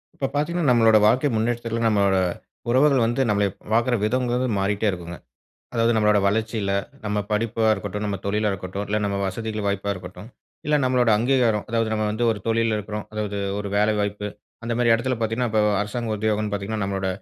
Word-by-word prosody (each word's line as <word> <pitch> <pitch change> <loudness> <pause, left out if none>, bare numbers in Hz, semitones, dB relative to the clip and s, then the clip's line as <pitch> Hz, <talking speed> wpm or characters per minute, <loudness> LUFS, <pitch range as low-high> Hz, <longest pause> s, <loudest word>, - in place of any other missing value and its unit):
இப்ப 135 - -2
பாத்தீங்கன்னா, 155 +1 0
நம்மளோட 115 -2 +5
வாழ்க்கை 130 +6 +3
முன்னேற்றத்துல 115 +1 -1
நம்மளோட 100 -3 +3 0.5
உறவுகள் 135 0 +4
வந்து 120 +4 +1
நம்மள 105 -1 +2
ப் - - -32 0.2
பாக்குற 115 +2 +2
விதங்கிறது 125 +2 0
மாறிட்டே 100 +2 0
இருக்குங்க. 85 -2 -5 0.6
அதாவது 115 0 +2
நம்மளோட 105 -1 +4
வளர்ச்சியில, 110 0 0 0.3
நம்ம 105 0 -1
படிப்பா 110 +1 0
இருக்கட்டும், 105 0 -3
நம்ம 100 -1 -2
தொழிலா 105 +1 +1
இருக்கட்டும், 95 +2 -5
இல்ல 105 +1 +1
நம்ம 100 -1 -1
வசதிகள் 110 +2 -3
வாய்ப்பா 100 0 -1
இருக்கட்டும், 90 +4 -10 0.4
இல்ல 150 0 +3
நம்மளோட 125 -2 +2
அங்கீகாரம். 120 -4 +2
அதாவது 115 -1 0
நம்ம 110 0 0
வந்து 110 +3 -1
ஒரு 110 -2 -3
தொழில்ல 115 -1 +1
இருக்கோம். 105 0 -5
அதாவது 105 -1 -3 0.2
ஒரு 105 -1 -4
வேலை 105 +1 +3
வாய்ப்பு. 105 0 -2 0.4
அந்தமாரி 120 0 +2
எடத்துல 125 +2 -1
பாத்தீங்கன்னா, 115 +2 0
இப்போ 110 - +3 0.2
அரசாங்க 110 +2 -3
உத்தியோகன்னு 105 0 -1
பாத்தீங்கன்னா, 100 +1 -3
நம்மளோட 95 -1 -2
110 Hz, 170 wpm, -23 LUFS, 105-120 Hz, 0.6 s, நம்மளோட